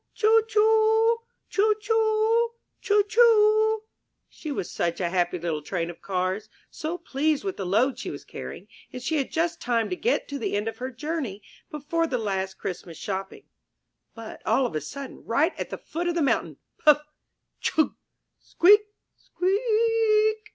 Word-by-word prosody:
Choo, 450 Hz, 0 st, +5 dB
choo! 445 Hz, +1 st, +4 dB, 0.3 s
Choo, 425 Hz, +1 st, +2 dB
choo! 445 Hz, +1 st, +2 dB, 0.3 s
Choo, 415 Hz, 0 st, +3 dB
choo! 435 Hz, -1 st, +4 dB, 0.4 s
She 310 Hz, -, -8 dB
was 230 Hz, -, -4 dB
such 170 Hz, -1 st, -1 dB
a 175 Hz, -2 st, 0 dB
happy 175 Hz, 0 st, 0 dB
little 165 Hz, -3 st, -3 dB
Train 170 Hz, +2 st, -3 dB
of 170 Hz, -, -17 dB
Cars, 190 Hz, +3 st, -2 dB, 0.2 s
so 320 Hz, +3 st, -4 dB
pleased 310 Hz, -1 st, -1 dB
with 390 Hz, -1 st, -3 dB
the 190 Hz, -, -4 dB
load 235 Hz, +8 st, +2 dB
she -, -, -5 dB
was -, -, -8 dB
carrying, -, -, -8 dB, 0.2 s
and 250 Hz, -, -6 dB
she 310 Hz, +5 st, -1 dB
had 275 Hz, -, -2 dB
just 330 Hz, +1 st, -1 dB
time 235 Hz, +1 st, 0 dB
to -, -, 0 dB
get 465 Hz, +7 st, 0 dB
to 285 Hz, 0 st, -4 dB
the -, -, -2 dB
end 205 Hz, +2 st, -1 dB
of 225 Hz, -, -5 dB
her 255 Hz, +1 st, -3 dB
journey 260 Hz, -, -4 dB, 0.3 s
before 305 Hz, +3 st, -1 dB
the 260 Hz, -, -1 dB
last 190 Hz, -4 st, -2 dB
Christmas 175 Hz, -3 st, -6 dB
shopping. 195 Hz, -1 st, -5 dB, 0.7 s
But 225 Hz, -1 st, -9 dB
all 265 Hz, -, +2 dB
of 240 Hz, -, -3 dB
a 155 Hz, -, -1 dB
sudden, 265 Hz, -, -8 dB
right 300 Hz, +10 st, +1 dB
at -, -, -4 dB
the -, -, -5 dB
foot 340 Hz, +3 st, -4 dB
of 345 Hz, -, 0 dB
the 335 Hz, -, +1 dB
mountain, 275 Hz, -, 0 dB, 0.3 s
Puff! 300 Hz, 0 st, +6 dB, 0.6 s
Chug! 315 Hz, -, +1 dB, 0.5 s
Squeak! 410 Hz, +5 st, +5 dB, 0.4 s
Squea 370 Hz, +2 st, -1 dB
ea 445 Hz, -1 st, +3 dB
eak 430 Hz, 0 st, -13 dB
310 Hz, 170 wpm, -26 LUFS, -, 0.7 s, Puff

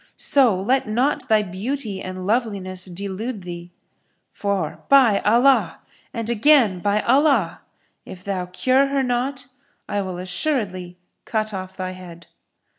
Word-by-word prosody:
So 245 Hz, -9 st, +3 dB
let 255 Hz, +7 st, +1 dB
not 245 Hz, +7 st, 0 dB
thy 215 Hz, -1 st, +4 dB
beauty 205 Hz, +2 st, -4 dB
and 185 Hz, 0 st, -6 dB
loveliness 200 Hz, -5 st, -1 dB
delude 200 Hz, +4 st, -6 dB
thee: 175 Hz, -1 st, -8 dB, 0.6 s
for, 200 Hz, -6 st, -2 dB
by 255 Hz, -7 st, +6 dB
Allah! 230 Hz, -6 st, +3 dB, 0.3 s
and 230 Hz, -1 st, -4 dB
again, 235 Hz, -4 st, +4 dB
by 205 Hz, +3 st, +1 dB
Allah! 260 Hz, -, +2 dB, 0.4 s
If 185 Hz, -1 st, -11 dB
thou 185 Hz, -3 st, -3 dB
cure 255 Hz, +9 st, +2 dB
her 275 Hz, -1 st, 0 dB
not, 255 Hz, +2 st, -2 dB, 0.4 s
I 205 Hz, -, -1 dB
will 185 Hz, -2 st, -5 dB
assuredly 185 Hz, -, -3 dB, 0.3 s
cut 215 Hz, -1 st, -2 dB
off 190 Hz, 0 st, -6 dB
thy 185 Hz, -1 st, -4 dB
head." 175 Hz, -2 st, -11 dB
205 Hz, 130 wpm, -22 LUFS, 185-250 Hz, 0.6 s, by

